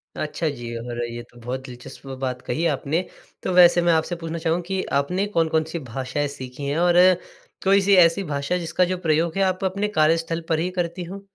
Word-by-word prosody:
अच्छा, 155 +2 -2
जी 120 -4 -6
और 120 0 -4
ये 120 0 -6
तो 120 - -17
बहुत 125 +3 -4
दिलचस्प 125 +1 -11 0.2
बात 125 -1 -2
कही 165 +5 -2
आपने। 155 +2 0 0.4
तो - - -1
वैसे 175 -1 +7
मैं 170 -1 +3
आपसे 160 +2 0
पूछना 165 0 -5
चाहूँगा 165 +1 0
कि 190 -1 -1 0.2
आपने 180 +7 -1
कौन-कौन-सी 160 0 +1
भाषाएँ 135 +4 -2
सीखीं 140 0 -7
हैं? 145 - -1
और 175 0 +4 0.7
कोई-सी 195 0 +4
ऐसी 165 +4 0
भाषा 145 +2 -2
जिसका 175 +1 +1
जो 185 +1 -2
प्रयोग 160 +3 +1
है 195 - +3
आप 185 0 0
अपने 200 +3 0
कार्यस्थल 165 +1 +2
पर 160 -1 +2
ही 175 - 0
करती 175 +1 -2
हों? 195 +3 -8
165 Hz, 195 wpm, -23 LUFS, 140-180 Hz, 0.7 s, वैसे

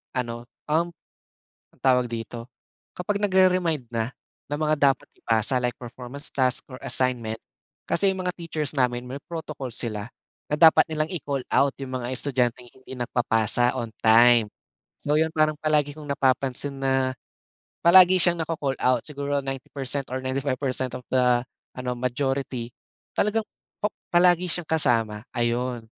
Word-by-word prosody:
ano, 120 -2 -3 0.3
um, 170 +2 +2 0.9
ang - - -29
tawag 125 -2 +4
dito, 115 +1 -6 0.5
kapag 200 +3 -1
nag-re-mind 185 - +2
na, 115 +2 -1 0.4
ng 145 +1 -2
mga 155 0 +2 0.2
dapat 130 - -15
ipasa 115 +3 +1
like 125 -1 0
performance 125 +3 -8
task 130 -1 +1
or 130 - -8
assignment. 120 -4 0 0.5
Kasi 195 +3 +3
yung 190 - -4
mga 180 - +1
teachers 155 -4 -3
namin 125 -1 +1
may 130 +2 -6
protocol 155 -6 -6
sila, 105 -3 -3 0.4
na - - +2
dapat 160 -1 +7
nilang 155 0 0
i-call 140 -5 -2
out 140 -1 +3
yung 130 -1 -3
mga 120 - -4
estudyanteng 125 -2 -1
hindi 130 0 -14
nagpapasa 120 0 +1
on 115 -1 -3
time. 115 0 +6 0.5
So 145 - -1
yun 160 0 +2
parang 155 -1 +2
palagi 150 -2 +1
kong 150 -1 -9
napapansin 135 0 0
na, 130 -1 +1 0.7
palagi 185 +1 +8
siyang 175 0 +2
na-co-call 145 -4 -2
out 125 -2 +2
siguro 145 -1 -2
90% 135 0 -3
or 130 - -2
95% 130 -1 -2
of 125 - -13
the 125 -2 +3 0.3
ano 125 -1 -3
majority 130 -1 -2 0.5
talagang 215 +2 +2 0.4
pa 210 - +3 0.2
palagi 175 0 +5
siyang 175 -1 -2
kasama, 115 -8 +1
ayun. 120 0 -1
130 Hz, 145 wpm, -25 LUFS, 120-155 Hz, 0.9 s, palagi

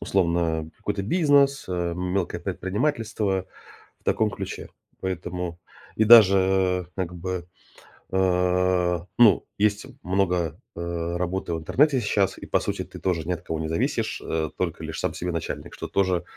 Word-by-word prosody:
условно, 85 -3 +1
э, 80 -2 -1
какой-то 105 -1 -2
бизнес, 140 - +3
э, 85 -2 -1
мелкое 90 -1 -2
предпринимательство. 100 - -1 0.5
В - - -36
таком 110 -1 +2
ключе. - - -6 0.3
Поэтому 90 -1 -4 0.3
и 110 - +3
даже, 110 -4 +9
э, 95 -1 +2
как 90 -2 -3
бы, 90 0 -4 0.7
а, 90 -1 +2
ну 110 -7 +6
есть 105 +1 +1 0.2
много, 90 -3 0 0.2
э, 85 0 -3
работы 90 0 -2
в - - -3
интернете 135 - +3
сейчас, 100 -3 +1
и - - -9
по - - +1
сути - - -2
ты - - -11
тоже 85 -4 -1
ни - - 0
от 85 - -6
кого 80 - -4
не 80 - -2
зависишь, 80 +1 -1
э, 80 -1 -1
только 85 -3 -2
лишь 80 - -5
сам - - -1
себе 90 0 -3
начальник, 85 - -5
что - - -6
тоже 95 -3 +1
90 Hz, 160 wpm, -25 LUFS, 85-100 Hz, 0.7 s, даже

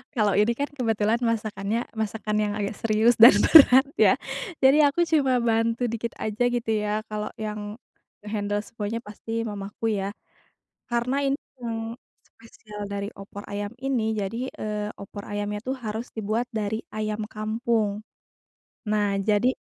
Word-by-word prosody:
Kalau 210 -4 +2
ini 210 +3 +4
kan, 285 - 0
kebetulan 225 -4 +1
masakannya 215 -2 -1 0.2
masakan 220 -1 -2
yang 205 -1 -1
agak 200 0 -2
serius, 225 +2 +3
dan 230 +2 +10 0.2
berat 265 -4 +9
ya, - - +6 0.5
jadi 285 +2 +6
aku 345 +3 +1
cuma 275 -6 +3
bantu 230 +1 +1
dikit 230 0 -3
aja 215 +2 -1
gitu, 240 -1 -2 0.2
ya, 210 0 0
kalau 210 0 -4
yang 210 0 -5 0.4
nge-handle 205 -1 -2
semuanya, 215 +1 -4
pasti 225 +1 -5
mamaku 205 +1 -6 0.2
ya. 195 - -3 0.7
Karena 250 +4 0
in 275 - +2 0.2
yang 230 -1 -4 0.2
spesial 210 -2 -11
dari 200 0 -4
opor 200 +1 -9
ayam 205 0 -4
ini. 245 -5 0
Jadi, 225 +5 -3
eee, 210 0 -4
opor 200 +1 -8
ayamnya 205 0 -3
tuh 260 - -1
harus 220 +1 -5
dibuat 220 +2 -1
dari 215 0 -1 0.2
ayam 215 0 -2
kampung. 215 -1 -1 0.9
Nah 205 -2 +1
jadi 210 +5 +3
220 Hz, 145 wpm, -25 LUFS, 210-235 Hz, 0.9 s, dan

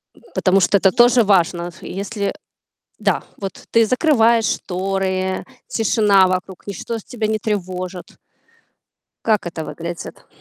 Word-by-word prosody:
м, - - -21
потому 190 +1 +3
что, 200 +2 +4
это 190 0 +4
тоже 240 +2 +5
важно. 175 -3 +2
Ф 175 - -12
если, 200 +2 -4
э - - -2 0.7
да, - - +1
вот 195 -2 -7
ты 230 -1 +5
закрываешь 235 -4 +3
шторы, 190 0 -1 0.2
тишина 205 -4 +3
вокруг, 185 0 -4
ничто 225 +4 -4
тебя 215 0 -4
не 215 0 0
тревожит. 185 -3 -4 1.1
Как 215 -5 +2
это 165 -2 -5
выглядит? 170 0 -7
195 Hz, 135 wpm, -20 LUFS, 185-220 Hz, 1.1 s, тоже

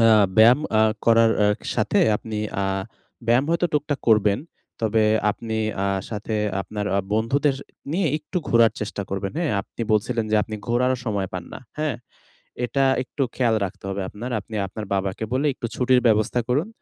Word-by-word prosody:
অ্যাঁ 110 -2 +6
ব্যায়াম 120 +6 +7 0.2
আ - - +6 0.2
করার 115 0 +6
আ - - +5 0.3
সাথে, - - +2 0.2
আপনি 110 0 -6 0.2
অ্যাঁ 95 0 -1 0.5
ব্যায়াম 120 +4 +4
হয়তো 170 +1 +2
টুকটাক 145 -1 0
করবেন। 105 -2 +4 0.4
তবে 110 0 +2 0.3
আপনি 110 +1 -4 0.3
আ - - +1 0.2
সাথে 110 +1 -4 0.3
আপনার 105 0 -5
আ - - +3 0.2
বন্ধুদের 135 +6 +1 0.4
নিয়ে 180 0 +1
একটু 155 +5 -4
ঘোরার 115 -1 +5
চেষ্টা 105 -1 -3
করবেন। 95 0 -3
হ্যাঁ? 170 -4 0
আপনি 110 - -12
বলছিলেন 115 +2 +1
যে 110 - +3
আপনি 110 +2 -6
ঘোরারও 125 +2 +2
সময় 100 -3 -1
পান 90 -2 -5
না। - - -6 0.2
হ্যাঁ? 150 -6 -1 0.7
এটা 135 +3 +1 0.2
একটু 135 +2 -4
খেয়াল 120 -3 +2
রাখতে 100 +1 -7
হবে 100 0 -3
আপনার। 120 +5 -7
আপনি 110 +2 -11
আপনার 105 +3 -7
বাবাকে 95 +2 -2
বলে 135 +4 +1
একটু 115 - -4
ছুটির 125 0 +3
ব্যবস্থা 110 +2 +3
করুন। 145 - +1
115 Hz, 170 wpm, -23 LUFS, 105-130 Hz, 0.7 s, ব্যায়াম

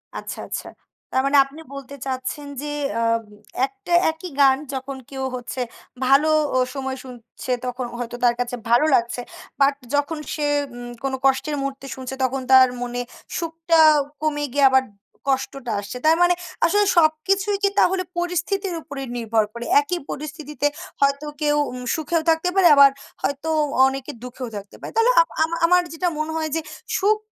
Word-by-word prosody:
আচ্ছা, - - -6
আচ্ছা। - - -5 0.4
তার 260 - +2
মানে 280 +1 +4
আপনি 275 +3 -13
বলতে 275 0 -8
চাচ্ছেন 260 +2 -4
যে, 295 - -5 0.3
আ - - 0 0.6
একটা 270 +5 -6 0.2
একই 320 +3 -9
গান 270 -1 +6 0.2
যখন 265 +1 -5
কেউ 265 -1 -4
হচ্ছে 250 +1 -5 0.4
ভালো 275 +4 +5 0.3
অ - - +4 0.2
সময় 265 -1 -4
শুনছে, 250 0 -8
তখন 250 0 -3
হয়তো 240 0 -4
তার 240 -1 +4
কাছে 245 0 -1
ভালো 240 +6 +5
লাগছে। 235 +1 0 0.4
বাট 275 +1 +3 0.2
যখন 290 +2 0 0.2
সে 300 - -1 0.3
উম 245 0 -7
কোনো 270 -1 -1
কষ্টের 270 +3 +2
মুহূর্তে 275 0 -4
শুনছে, 260 0 -6
তখন 260 +1 0
তার 260 0 +9
মনে 245 0 -3 0.4
সুখটা 330 0 +1 0.4
কমে 295 -1 0
গিয়ে 285 -1 +4
আবার 265 0 +4 0.4
কষ্টটা 265 -2 -1
আসছে। 205 +5 -6
তার 320 +1 +6
মানে 350 0 +5 0.3
আসলে 410 +4 +3
সব 310 -2 +6 0.2
কিছুই 395 +1 +2
কি 400 - +5
তাহলে 370 0 +3
পরিস্থিতির 360 +2 -1
উপরে 280 -2 -7 0.2
নির্ভর 225 -1 +1
করে? 235 0 -6 0.2
একই 360 -5 -3
পরিস্থিতিতে 300 0 -3 0.3
হয়তো 280 +1 +2 0.2
কেউ 295 -1 +2 0.2
উম 250 0 -7
সুখেও 320 +1 0
থাকতে 325 +2 +2
পারে, 380 -2 +6
আবার 280 -1 +8 0.3
হয়তো 285 +3 -2 0.4
অনেকে 270 +1 -2
দুঃখেও 250 0 -6
থাকতে 200 0 -8
পারে। - - -7
তাহলে 455 +2 +5
আ - - +10 0.2
আমা 325 +1 -1
আমার 360 +1 +5
যেটা 355 +2 -1
মনে 310 +1 -2
হয় 315 -1 -2
যে, 325 - 0 0.4
সুখ 420 +2 +3
280 Hz, 165 wpm, -22 LUFS, 260-320 Hz, 0.6 s, আ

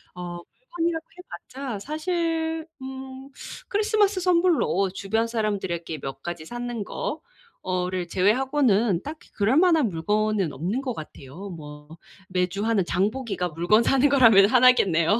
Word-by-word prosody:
어 175 -1 -6 0.2
물건이라고 340 -8 -3
해봤자 270 - -7
사실 325 - -2 0.2
음 265 0 -8 0.4
크리스마스 420 -1 +2
선물로 340 - +2
주변 220 +4 -1
사람들에게 190 - -3
몇 135 - -6
가지 175 -2 -5
샀는 240 +1 -5
거 310 +9 -4 0.4
어를 180 -1 -2
제외하고는 220 - +2
딱히 305 +2 -9
그럴만한 300 - +3
물건은 205 +1 0
없는 190 - -2
것 255 -3 -3
같아요. 155 +3 -9
뭐 150 -3 -10 0.4
매주 185 +2 -1
하는 225 -4 +2
장 190 +4 +1
보기가 220 -8 -3
물건 175 +8 +3
사는 270 +3 +3
거라면 230 -8 +7
하나겠네요. 215 -7 +4
220 Hz, 300 characters per minute, -25 LUFS, 180-280 Hz, 0.4 s, 거라면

